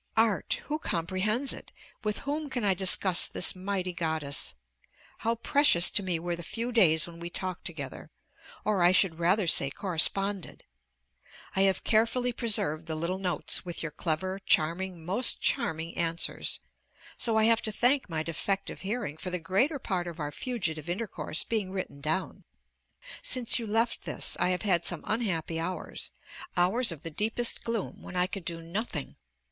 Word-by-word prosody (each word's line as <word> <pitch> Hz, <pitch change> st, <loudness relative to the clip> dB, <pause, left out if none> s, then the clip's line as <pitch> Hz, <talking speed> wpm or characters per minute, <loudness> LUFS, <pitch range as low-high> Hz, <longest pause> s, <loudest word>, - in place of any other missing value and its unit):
Art! 230 Hz, -, +2 dB
who 300 Hz, +1 st, -2 dB
comprehends 195 Hz, -, 0 dB
it? -, -, -10 dB, 0.3 s
with 210 Hz, -1 st, -1 dB
whom 295 Hz, +1 st, -2 dB
can 245 Hz, -3 st, -2 dB
I 195 Hz, -, +4 dB
discuss 185 Hz, -1 st, +4 dB
this 180 Hz, -, +4 dB
mighty 185 Hz, -1 st, -3 dB
goddess? 150 Hz, -, -2 dB, 0.6 s
How 230 Hz, +2 st, 0 dB
precious 235 Hz, -7 st, +4 dB
to -, -, 0 dB
me 180 Hz, -3 st, -1 dB
were 175 Hz, +1 st, -2 dB
the 170 Hz, -, -8 dB
few 230 Hz, +8 st, -4 dB
days 160 Hz, -9 st, +5 dB
when 170 Hz, -1 st, -11 dB
we 170 Hz, 0 st, -6 dB
talked 185 Hz, 0 st, -5 dB
together, 135 Hz, -, -7 dB, 0.6 s
or, 205 Hz, -3 st, +1 dB
I 175 Hz, +1 st, +6 dB
should 180 Hz, -4 st, +2 dB
rather 185 Hz, +4 st, +3 dB
say, 150 Hz, -4 st, +4 dB
corresponded! 195 Hz, +3 st, 0 dB, 0.9 s
I 190 Hz, -, +3 dB
have 190 Hz, -, -2 dB
carefully 235 Hz, +3 st, +2 dB
preserved 170 Hz, -10 st, 0 dB
the 160 Hz, -, -3 dB
little 170 Hz, +4 st, -2 dB
notes 180 Hz, -2 st, +1 dB
with 175 Hz, -2 st, -4 dB
your 160 Hz, -, -3 dB
clever, 185 Hz, +5 st, -2 dB
charming, 170 Hz, +2 st, +1 dB
most 205 Hz, +8 st, +3 dB
charming 165 Hz, -, -1 dB
answers; 165 Hz, 0 st, 0 dB, 0.5 s
so 225 Hz, -2 st, +2 dB
I 220 Hz, -, +4 dB
have 230 Hz, +1 st, +4 dB
to 215 Hz, -, -2 dB
thank 250 Hz, +3 st, +2 dB
my 160 Hz, -2 st, -1 dB
defective 195 Hz, +5 st, -3 dB
hearing 195 Hz, -, -3 dB
for 185 Hz, -, -4 dB
the 180 Hz, -, 0 dB
greater 195 Hz, -, +1 dB
part 185 Hz, -8 st, -2 dB
of 170 Hz, -1 st, -7 dB
our 150 Hz, -1 st, -3 dB
fugitive 170 Hz, -, -2 dB
intercourse 175 Hz, -5 st, -1 dB
being 210 Hz, -5 st, -1 dB
written 185 Hz, -7 st, -5 dB
down. 160 Hz, +6 st, -2 dB, 0.8 s
Since 255 Hz, -, +3 dB
you 230 Hz, -, -5 dB
left 230 Hz, +2 st, +1 dB
this -, -, -1 dB
I -, -, +2 dB
have 180 Hz, +2 st, -1 dB
had 180 Hz, -5 st, +3 dB
some 175 Hz, -, +1 dB
unhappy 170 Hz, -8 st, -1 dB
hours, 180 Hz, +3 st, -4 dB, 0.5 s
hours 195 Hz, +7 st, +4 dB
of 160 Hz, -3 st, -7 dB
the 165 Hz, -, -6 dB
deepest 225 Hz, +7 st, +1 dB
gloom, 230 Hz, -4 st, -3 dB
when -, -, -9 dB
I 180 Hz, 0 st, +3 dB
could 190 Hz, -2 st, -6 dB
do 165 Hz, -1 st, -5 dB
nothing. 170 Hz, -, -4 dB
185 Hz, 170 wpm, -29 LUFS, 165-220 Hz, 0.9 s, I